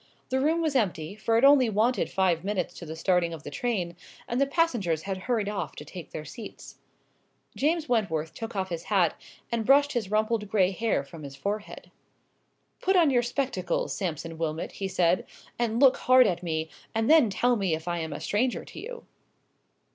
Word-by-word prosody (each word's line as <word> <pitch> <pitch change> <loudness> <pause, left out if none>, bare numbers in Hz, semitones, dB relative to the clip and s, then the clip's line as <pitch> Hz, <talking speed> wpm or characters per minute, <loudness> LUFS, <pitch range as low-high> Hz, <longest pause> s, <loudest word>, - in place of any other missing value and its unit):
The 260 - +1
room 320 +4 +2
was 310 -3 0
empty, 185 -7 0
for 225 +1 +1
it 230 - +2
only 275 -4 +6
wanted 220 +4 +1
five 180 -3 +1
minutes 190 -3 -2
to 170 - -9
the 160 - -6
starting 170 0 +1
of 155 - -12
the - - -7
train, 190 -9 -2 0.3
and 240 +3 -1
the 275 - +3
passengers 235 - 0
had 195 -1 -3
hurried 225 -5 +1
off 205 -2 -3
to - - -9
take 180 -3 -9
their 155 - -7
seats. 225 +2 -10 0.8
James 315 +2 +1
Wentworth 160 -10 0
took 225 -1 -7
off 190 -1 -1
his 170 -1 -5
hat, 185 -6 +2 0.4
and 230 -1 0
brushed 285 +4 +5
his 230 -6 -2
rumpled 215 0 0
grey 190 -3 +3
hair 220 -6 0
from 155 +3 -12
his 140 -2 -8
forehead. 205 +8 -5 0.9
"Put 385 +1 +2
on 330 -6 +5
your 245 -2 +4
spectacles, 275 - -2
Sampson 165 -3 -4
Wilmot," 160 0 -2
he 195 - -4
said, 180 -1 +2 0.4
"and 235 -1 0
look 265 -1 +6
hard 255 0 +6
at 175 - 0
me, 160 -2 -3 0.2
and 225 0 +1
then 310 -8 +6
tell 245 +5 +2
me 195 -7 0
if 160 +2 -9
I 175 0 -1
am 160 -1 -4
a - - -5
stranger 245 +5 -1
to - - -10
you." 475 +1 -8
210 Hz, 195 wpm, -27 LUFS, 175-250 Hz, 0.9 s, only